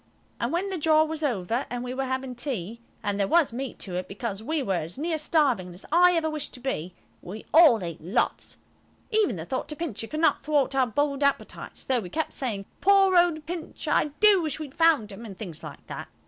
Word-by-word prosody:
And -, -, -1 dB
when 370 Hz, +4 st, -1 dB
the 370 Hz, -, -3 dB
jaw 310 Hz, 0 st, +4 dB
was 315 Hz, 0 st, -4 dB
over 235 Hz, -, -1 dB
and 245 Hz, 0 st, -4 dB
we 250 Hz, 0 st, -4 dB
were 270 Hz, +1 st, -2 dB
having 260 Hz, 0 st, -3 dB
tea–and 230 Hz, -, -4 dB
there 200 Hz, -, +2 dB
was 325 Hz, -4 st, +3 dB
meat 260 Hz, +1 st, -5 dB
to 185 Hz, -, -5 dB
it, 180 Hz, -, -4 dB
because 200 Hz, 0 st, -5 dB
we 305 Hz, +5 st, -1 dB
were 195 Hz, -, 0 dB
as 165 Hz, +7 st, -8 dB
near 320 Hz, +2 st, -1 dB
starving 265 Hz, -, +1 dB
as 180 Hz, -, -10 dB
I 355 Hz, +2 st, +6 dB
ever 325 Hz, -1 st, +1 dB
wish 310 Hz, -2 st, -3 dB
to -, -, -7 dB
be–we 185 Hz, -3 st, -6 dB
all 290 Hz, -, +7 dB
ate 170 Hz, -2 st, -6 dB
lots. 180 Hz, +9 st, -1 dB, 0.5 s
Even 430 Hz, -, +2 dB
the 160 Hz, -2 st, -6 dB
thought 260 Hz, -, -3 dB
of 300 Hz, -, -6 dB
Pincher 265 Hz, -10 st, -4 dB
could 305 Hz, -, -4 dB
not 325 Hz, -, +3 dB
thwart 285 Hz, -2 st, +1 dB
our 265 Hz, -2 st, +3 dB
bold 285 Hz, +3 st, 0 dB
appetites, 280 Hz, 0 st, -2 dB
though 260 Hz, -2 st, +2 dB
we 185 Hz, -5 st, -7 dB
kept 320 Hz, -, -2 dB
saying, 215 Hz, -7 st, -3 dB, 0.2 s
"Poor 390 Hz, -1 st, +5 dB
old 345 Hz, -3 st, +3 dB
Pincher!" 335 Hz, 0 st, -5 dB
"I -, -, +4 dB
do 420 Hz, -3 st, +6 dB
wish 310 Hz, -2 st, -3 dB
we'd 295 Hz, -4 st, -7 dB
found 325 Hz, -10 st, +3 dB
him," 200 Hz, +4 st, -9 dB
and 200 Hz, -5 st, -9 dB
things 175 Hz, -7 st, -7 dB
like -, -, -10 dB
that. -, -, -7 dB
270 Hz, 215 wpm, -26 LUFS, 215-315 Hz, 0.5 s, all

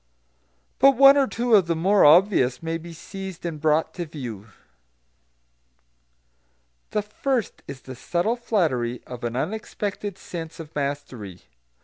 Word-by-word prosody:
But 275 Hz, 0 st, +6 dB
one 275 Hz, +1 st, +9 dB
or 275 Hz, -2 st, +3 dB
two 240 Hz, 0 st, -1 dB
of 195 Hz, -5 st, +6 dB
the 165 Hz, -, +1 dB
more 190 Hz, +5 st, +3 dB
obvious 150 Hz, -5 st, +4 dB
may 165 Hz, 0 st, -2 dB
be 170 Hz, +1 st, -10 dB
seized 190 Hz, +2 st, -8 dB
and 160 Hz, -3 st, -4 dB
brought 160 Hz, +1 st, +2 dB
to 175 Hz, -2 st, -5 dB
view. 120 Hz, -9 st, -7 dB, 2.4 s
The 210 Hz, -, -1 dB
first 235 Hz, +2 st, -2 dB
is 135 Hz, -2 st, -8 dB
the 130 Hz, -, -9 dB
subtle 175 Hz, -, -1 dB
flattery 150 Hz, -, -1 dB
of 125 Hz, -1 st, -9 dB
an 120 Hz, 0 st, -3 dB
unexpected 205 Hz, +4 st, -4 dB
sense 165 Hz, -3 st, -8 dB
of 160 Hz, -1 st, -9 dB
mastery. 140 Hz, -10 st, -5 dB
165 Hz, 135 wpm, -24 LUFS, 140-205 Hz, 2.4 s, one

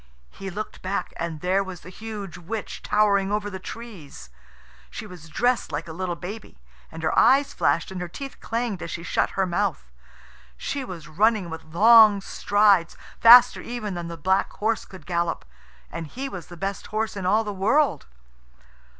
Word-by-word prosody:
He 195 Hz, -, -7 dB
looked 210 Hz, +4 st, -6 dB
back, 190 Hz, +2 st, -3 dB
and 165 Hz, -3 st, -4 dB
there 190 Hz, +2 st, +1 dB
was 190 Hz, -2 st, -9 dB
the 180 Hz, -, -11 dB
huge 210 Hz, -2 st, -7 dB
witch, 195 Hz, +5 st, -6 dB
towering 200 Hz, -2 st, +2 dB
over 205 Hz, 0 st, -1 dB
the 190 Hz, -, -6 dB
trees. 180 Hz, -, -10 dB, 0.6 s
She -, -, -7 dB
was 180 Hz, -5 st, -12 dB
dressed 245 Hz, +9 st, 0 dB
like 150 Hz, +4 st, -4 dB
a 160 Hz, -, -7 dB
little 180 Hz, 0 st, -3 dB
baby, 200 Hz, -, -8 dB, 0.3 s
and 165 Hz, -, -8 dB
her 155 Hz, -, +1 dB
eyes 270 Hz, +4 st, +4 dB
flashed 170 Hz, -, +1 dB
and 185 Hz, -1 st, -5 dB
her 180 Hz, -, -3 dB
teeth 275 Hz, +10 st, -8 dB
clanged 230 Hz, -4 st, -3 dB
as -, -, -5 dB
she 170 Hz, -, -5 dB
shut -, -, 0 dB
her 190 Hz, -, +3 dB
mouth. 175 Hz, -, -2 dB, 0.7 s
She 275 Hz, -, -3 dB
was 170 Hz, -9 st, -8 dB
running 200 Hz, +1 st, +1 dB
with 160 Hz, -, -7 dB
long 215 Hz, +5 st, +7 dB
strides, 200 Hz, -3 st, +2 dB, 0.2 s
faster 245 Hz, +2 st, +8 dB
even 230 Hz, -4 st, -5 dB
than 175 Hz, -1 st, -5 dB
the 170 Hz, 0 st, -7 dB
black 190 Hz, +5 st, +1 dB
horse 220 Hz, +1 st, -1 dB
could 185 Hz, -6 st, -13 dB
gallop 170 Hz, -1 st, -1 dB, 0.5 s
and 165 Hz, -, -5 dB
he 265 Hz, -, -5 dB
was 185 Hz, -9 st, -8 dB
the 175 Hz, -, -11 dB
best 195 Hz, +3 st, -4 dB
horse 215 Hz, 0 st, -2 dB
in 190 Hz, -2 st, -3 dB
all 215 Hz, +4 st, +3 dB
the 210 Hz, -1 st, -4 dB
world. 205 Hz, -, +1 dB
195 Hz, 180 wpm, -24 LUFS, 170-220 Hz, 0.7 s, faster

